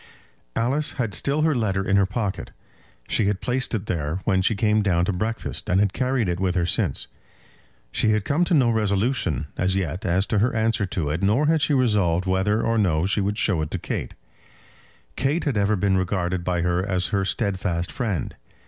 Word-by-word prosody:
Alice 135 +6 0
had 115 -7 -2
still 145 +7 +1
her 160 -1 +3
letter 95 -6 -1
in 95 - +2
her 100 -1 +4
pocket. 100 -1 -3 0.6
She 105 - +1
had 100 -2 0
placed 125 -1 -1
it 105 - -3
there 80 0 -2
when 95 -1 +2
she 105 +4 +1
came 105 +1 +2
down 90 -4 +2
to 100 - -1
breakfast, 110 +5 -3
and 90 +1 +3
had 100 -1 +2
carried 130 -3 0
it 85 0 -2
with 95 -1 0
her 90 -2 +1
since. 85 - 0 0.9
She 110 - +1
had 105 -1 +1
come 155 +5 +2
to 175 - +2
no 125 -5 +4
resolution 100 - 0
as 95 +1 +1
yet 90 -1 -2
as 95 +2 +1
to 105 - +3
her 120 +4 +1
answer 110 -2 +1
to 80 -5 -2
it, 80 - -2
nor 105 +9 +2
had 160 0 +2
she 140 +1 +2
resolved 100 -9 +2
whether 95 +3 +1
or 115 0 +1
no 85 -5 +2
she 100 +2 +1
would 100 +1 -1
show 95 -9 +1
it 75 - -3
to - - -3
Kate. - - -4 1.0
Kate 140 +6 0
had 140 -5 -1
ever 100 +1 +2
been 100 0 +1
regarded 95 -1 -1
by 90 -1 0
her 90 +1 +1
as 95 -2 -1
her 100 -1 0
steadfast 95 -3 -1
friend. 105 - -3
100 Hz, 205 wpm, -23 LUFS, 90-115 Hz, 1.0 s, her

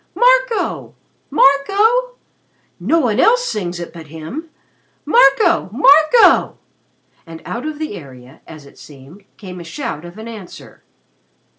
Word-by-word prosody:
Marco! - - +1 0.3
Marco! 405 - +2 0.6
No 245 - +1
one 235 -3 -1
else 485 - +3
sings 180 - -4
it 170 - -8
but 165 -2 -11
him. 165 - -8 0.6
Marco! 275 - +3
Marco!" 305 - +4 0.7
And 165 0 -10
out 245 +6 -5
of 310 -1 -6
the 310 -6 -5
area, 130 -4 -14
as 155 -3 -13
it 140 - -18
seemed, 150 +7 -16
came 185 -3 -10
a - - -9
shout 155 -1 -6
of 175 +3 -12
answer. 220 -4 -11
220 Hz, 125 wpm, -17 LUFS, -, 0.7 s, Marco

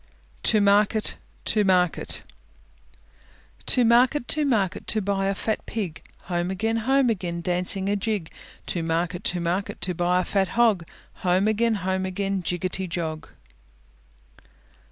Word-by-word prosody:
TO 215 - +3
MARKET, 205 +2 +3 0.3
TO 215 -1 +2
MARKET 180 -3 +1 1.4
To 250 - +4
market, 245 +4 +4
to 305 - +1
market, 210 -9 0
to 220 - +1
buy 195 -1 0
a 195 - 0
fat 220 +2 -2
Pig; 190 -8 -4 0.2
Home 175 0 -2
again, 220 +4 0
home 260 +2 +3
again, 175 -5 -3
dancing 180 +3 0
a 205 - +2
jig. 205 -5 -2 0.3
To 175 - -2
market, 165 +3 -1
to 175 - 0
market, 175 +4 -2
to 180 - -1
buy 175 +1 +2
a - - +1
fat 195 0 +1
Hog; 215 -8 +3 0.3
Home 185 +2 +2
again, 225 +1 +2
home 190 0 0
again, 195 0 -2
jiggety 180 +1 -2
jog. 160 -2 -4
195 Hz, 140 wpm, -25 LUFS, 180-215 Hz, 1.4 s, To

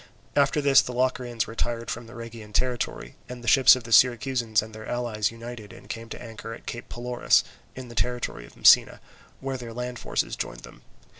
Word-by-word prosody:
After 145 +1 +3
this 140 -2 +6
the 125 - -6
Locrians 125 -2 -1
retired 115 +1 -3
from 120 0 -6
the 120 - -12
Rhegian 115 -2 -9
territory, 125 0 -2
and 125 -1 -8
the - - -9
ships 130 +4 +8
of 130 - -7
the 115 - -10
Syracusans 120 -1 +3
and 110 0 -11
their 110 0 -9
allies 115 -4 -1
united 115 -2 -9
and - - -14
came 115 0 -7
to - - -7
anchor 115 -1 -8
at - - -16
Cape 120 - -7
Pelorus, 120 0 +2 0.3
in 130 -1 -8
the 120 - -10
territory 115 - -2
of - - -19
Messina, - - +6 0.4
where 135 -1 -3
their 120 -2 -8
land 125 +1 -5
forces - - -2
joined - - -5
them. - - -14
120 Hz, 200 wpm, -26 LUFS, 115-125 Hz, 0.4 s, ships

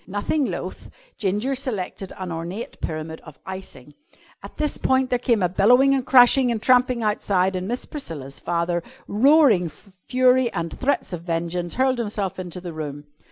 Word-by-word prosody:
Nothing 205 +9 -1
loth, - - -6 0.3
Ginger 210 +7 -1
selected 210 -8 -4
an 185 -2 -5
ornate 170 +7 -6
pyramid 160 0 -5
of 155 -3 -13
icing. 185 -8 -9 0.5
At - - -12
this 300 -1 -1
point 260 0 +1
there 245 - +2
came 235 -5 +1
a - - +4
bellowing 245 +9 +4
and 270 -2 +1
crashing 255 -1 +5
and 230 - -1
tramping 250 0 +3
outside 190 -3 +1
and 185 0 -3
Miss 245 +3 -3
Priscilla's 150 - -6
father, 175 0 -1 0.3
roaring 245 - +4
fury 250 - +1
and 170 0 -3
threats 270 -7 -1
of 170 - -4
vengeance, 170 +1 -3
hurled 260 0 +2
himself 205 -4 -3
into 180 -1 -6
the 175 -2 -7
room. 145 -2 -6
200 Hz, 160 wpm, -23 LUFS, 175-255 Hz, 0.5 s, crashing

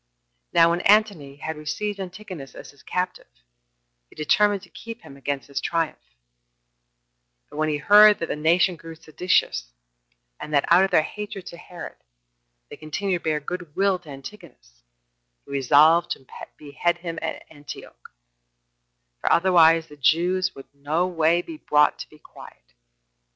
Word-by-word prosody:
Now 170 -1 +5
when 175 +1 -1
Antony 200 -10 +2
had 160 +3 -6
received 205 +7 -4
Antigonus 185 -6 -8
as - - -11
his 140 - -22
captive, 180 - -4 0.8
he - - -20
determined 205 +6 +2
to 180 - -15
keep 230 0 -10
him 135 - -13
against 140 0 -4
his 140 - -4
triumph; 165 - -3 1.4
but - - -10
when 155 0 0
he 150 - 0
heard 210 +6 +7
that 165 - -3
the - - -4
nation 170 +4 +2
grew 165 +1 -11
seditious, 160 - -1 0.7
and 150 - -8
that, 140 - +3
out 175 +3 +6
of 195 - +1
their 155 - +3
hatred 205 0 -7
to 170 - -10
Herod, 175 0 -10 0.7
they - - -9
continued 180 +4 -3
to - - -29
bear 155 -1 0
good 175 0 -7
will 195 -1 +2
to 170 -4 -17
Antigonus, 135 - -13 0.6
he - - -13
resolved 150 +5 +4
to 135 - -16 0.3
behead 160 +4 -2
him 170 -1 -6
at - - -5
Antioch, 145 - -12 1.1
for - - -1
otherwise 165 -2 +5
the 150 - -15
Jews 180 +6 +2
could 135 - -13
no 150 +5 -1
way 170 -1 +1
be 325 - -9
brought 150 - +2
to - - -8
be 155 - -18
quiet. - - -16
165 Hz, 155 wpm, -23 LUFS, 150-185 Hz, 1.4 s, heard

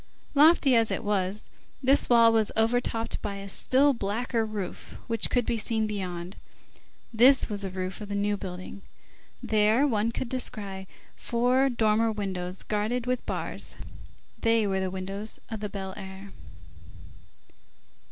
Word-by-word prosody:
Lofty 295 -2 +5
as 225 -1 +4
it - - -2
was, 200 0 -1 0.4
this 270 +2 +3
wall 230 -1 +6
was 220 -2 +2
overtopped 230 0 0
by 205 -1 -4
a 200 0 -7
still 270 +8 +3
blacker 230 +2 -1
roof, 210 -4 -6
which 230 -1 +1
could 245 -2 +1
be 230 - -1
seen 220 0 0
beyond. 185 -3 -5 0.8
This 255 +4 +5
was 205 -1 +1
the 195 - -1
roof 185 +1 -5
of 210 - -7
the 200 - -3
New 205 0 0
Building. 185 0 -8 0.6
There 215 +5 +3
one 225 -3 0
could 245 - -4
descry 200 -6 -3 0.3
four 250 +3 +1
dormer 225 -2 +2
windows, 185 -3 -4
guarded 215 +4 -1
with 250 0 -1
bars; - - -2 0.6
they 225 -1 +2
were 190 -1 0
the 190 0 -1
windows 195 +3 -5
of 220 -2 -5
the 210 0 -4
Fine 190 -1 -6
Air. 195 0 -9
215 Hz, 145 wpm, -27 LUFS, 195-235 Hz, 0.8 s, wall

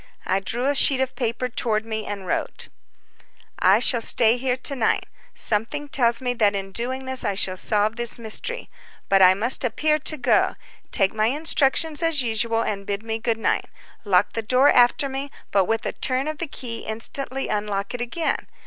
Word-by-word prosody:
I 190 - +1
drew 235 +6 -3
a 285 - +2
sheet 270 -1 +4
of 265 0 -2
paper 240 0 -2
toward 225 -3 -1
me 220 -1 -5
and 200 -2 -6
wrote: - - -3 0.9
"I - - +5
shall 240 -3 +3
stay 225 0 +4
here 250 0 -1
to 275 +2 +2
night. 235 -4 0 0.3
Something 230 +8 0
tells 240 -3 +1
me 245 -1 0
that 210 -4 +2
in 195 0 -4
doing 255 +5 -3
this 260 0 -2
I 200 - -1
shall 190 -1 0
solve 210 +3 0
this 235 -1 +1
mystery. 235 - -4 0.4
But 195 0 +4
I 185 0 +7
must 235 +8 +2
appear 305 +6 +1
to 310 +1 -1
go. 255 - +2 0.4
Take 195 -4 +2
my 215 0 +1
instructions 300 +2 +1
as 330 -5 +2
usual, 230 0 +1
and 200 -1 -3
bid 200 +1 -3
me 225 0 -3
good 225 0 -1
night. 225 - 0 0.4
Lock 200 -2 +2
the 225 - -2
door 255 +5 +3
after 245 +3 +3
me, 270 +1 -5 0.2
but 195 -2 +3
with 225 +3 -2
a - - -2
turn 260 +2 -1
of 310 -1 -4
the 335 - -3
key 240 -5 -6
instantly 260 +5 -3
unlock 205 -1 -3
it 245 - -5
again. 280 +7 -2
235 Hz, 195 wpm, -23 LUFS, 215-265 Hz, 0.9 s, I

